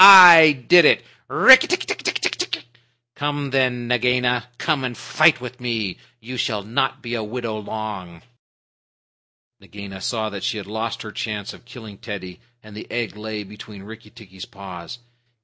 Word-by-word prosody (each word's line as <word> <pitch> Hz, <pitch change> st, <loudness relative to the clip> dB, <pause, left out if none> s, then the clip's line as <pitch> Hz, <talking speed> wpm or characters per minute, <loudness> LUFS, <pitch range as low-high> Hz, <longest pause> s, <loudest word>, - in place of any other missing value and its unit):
I 175 Hz, -5 st, +10 dB
did 175 Hz, -2 st, +7 dB
it! -, -, +3 dB, 0.2 s
Rikki 260 Hz, 0 st, +7 dB
tikki 360 Hz, -, -1 dB
tck -, -, -5 dB
tck! 360 Hz, -, -2 dB, 0.5 s
Come 145 Hz, 0 st, -4 dB
then, 125 Hz, -3 st, 0 dB
Nagaina. 125 Hz, 0 st, 0 dB
Come 150 Hz, -5 st, -1 dB
and 125 Hz, -2 st, -5 dB
fight 155 Hz, -1 st, +2 dB
with 125 Hz, 0 st, -10 dB
me. 115 Hz, -6 st, -3 dB, 0.2 s
You 125 Hz, +3 st, -9 dB
shall 105 Hz, -3 st, -2 dB
not 120 Hz, +5 st, -2 dB
be 120 Hz, 0 st, -6 dB
a 115 Hz, -2 st, -3 dB
widow 110 Hz, 0 st, -5 dB
long." 100 Hz, -5 st, -8 dB, 1.4 s
Nagaina 95 Hz, 0 st, -11 dB
saw 110 Hz, +1 st, -3 dB
that 100 Hz, -1 st, -8 dB
she 110 Hz, -, -2 dB
had 100 Hz, -, -7 dB
lost 110 Hz, +3 st, -5 dB
her 110 Hz, -, -9 dB
chance 105 Hz, -2 st, -5 dB
of -, -, -17 dB
killing 110 Hz, -5 st, -12 dB
Teddy, 95 Hz, -5 st, -8 dB, 0.2 s
and 110 Hz, -1 st, -14 dB
the 105 Hz, -, -9 dB
egg 120 Hz, -2 st, -4 dB
lay 105 Hz, 0 st, -6 dB
between 105 Hz, 0 st, -13 dB
Rikki 110 Hz, +1 st, -13 dB
tikki's 95 Hz, -5 st, -13 dB
paws. 95 Hz, +2 st, -10 dB
110 Hz, 160 wpm, -21 LUFS, 105-125 Hz, 1.4 s, I